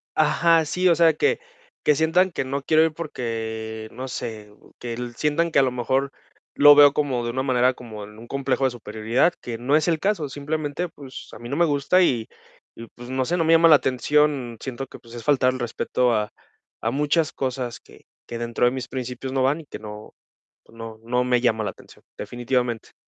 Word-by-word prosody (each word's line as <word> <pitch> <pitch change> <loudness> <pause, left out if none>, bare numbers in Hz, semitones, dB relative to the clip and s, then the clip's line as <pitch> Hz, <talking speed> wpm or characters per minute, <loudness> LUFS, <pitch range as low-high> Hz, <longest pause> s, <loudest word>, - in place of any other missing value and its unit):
Ajá, 160 +2 +3
sí, 180 +4 0
o 170 - +5
sea 165 -1 +5
que - - +1 0.4
que 150 - +4
sientan 175 +5 +2
que 135 - -3
no 140 +1 -3
quiero 155 +3 +4
ir 160 -1 +1
porque 110 -7 -5
no 130 +1 -7
sé, 110 -4 -6 0.3
que 120 -1 -5 0.2
sientan 165 +3 +1
que 140 - +4
a - - +5
lo 130 - +1
mejor 130 +3 -1 0.4
lo 145 0 +8
veo 145 -1 +8
como 130 -5 -1
de 120 - -2
una 130 +2 -2
manera 130 -1 +2
como 110 -4 -9
en 105 +1 -15
un 120 - -12
complejo 140 0 -1
de 135 - +4
superioridad, 115 +7 0
que 115 -2 -5
no 130 +5 +1
es 155 +1 +2
el 160 - +1
caso. 195 -7 -1
Simplemente, 150 +3 -3
pues 140 -5 -11
a - - -10
mí 120 - -9
no 140 - -2
me 170 - +4
gusta 145 +4 +2
y 120 -9 +1 0.5
y 115 - -10
pues 120 +1 -11
no 130 0 -1
sé, 175 - 0
no 165 - +2
me 165 - +4
llama 165 0 +6
la 155 - +9
atención. 135 -2 +1
Siento 135 0 -5
que - - -12
pues, 115 0 -16
es 120 - -8
faltar 130 -3 +3
el 130 - -6
respeto 120 +1 0
a 105 -1 -1 0.5
a 115 - -1
muchas 150 +3 +1
cosas 125 -2 -3
que - - -20 0.2
que 120 - -5
dentro 120 +1 0
de 120 - +4
mis 130 -1 -5
principios 130 0 -5
no 135 - +1
van 140 +5 +1
y - - -17
que - - -9
no, 105 0 -10 0.5
pues - - -21
no 115 -1 -8
no 125 +2 +1
me 125 -1 +2
llama 110 -3 +1
la - - -2
atención, - - -18
definitivamente. 120 -1 -2
130 Hz, 220 wpm, -23 LUFS, 120-150 Hz, 0.5 s, la